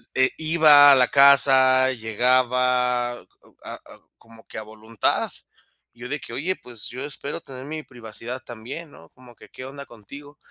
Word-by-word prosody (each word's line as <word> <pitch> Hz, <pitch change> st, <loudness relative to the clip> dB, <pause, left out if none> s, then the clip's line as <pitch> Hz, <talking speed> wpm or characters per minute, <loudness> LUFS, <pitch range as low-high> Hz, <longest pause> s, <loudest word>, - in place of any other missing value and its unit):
e 130 Hz, 0 st, +2 dB
iba 155 Hz, -3 st, +6 dB
a -, -, +7 dB
la 125 Hz, -1 st, +3 dB
casa, 130 Hz, -2 st, +5 dB
llegaba 125 Hz, +1 st, 0 dB
a 120 Hz, -, -13 dB, 0.4 s
a -, -, -9 dB, 0.4 s
como 115 Hz, 0 st, -19 dB
que -, -, -11 dB
a 110 Hz, -, -6 dB
voluntad, 110 Hz, 0 st, -3 dB, 0.6 s
yo 120 Hz, +1 st, -11 dB
de 150 Hz, -, -4 dB
que: 115 Hz, -, -11 dB
"Oye, 170 Hz, +9 st, -3 dB
pues, 120 Hz, -4 st, -3 dB
yo 130 Hz, +3 st, -8 dB
espero 145 Hz, +1 st, -5 dB
tener 130 Hz, -2 st, -11 dB
mi 155 Hz, +1 st, -6 dB
privacidad 120 Hz, 0 st, -10 dB
también", 125 Hz, +8 st, -10 dB
¿no?, 80 Hz, -, -17 dB
como 125 Hz, -1 st, -18 dB
que, 110 Hz, -, -17 dB
"¿Qué -, -, -12 dB
onda 140 Hz, +1 st, -10 dB
contigo?", 140 Hz, +7 st, -14 dB
130 Hz, 165 wpm, -22 LUFS, 120-140 Hz, 0.6 s, a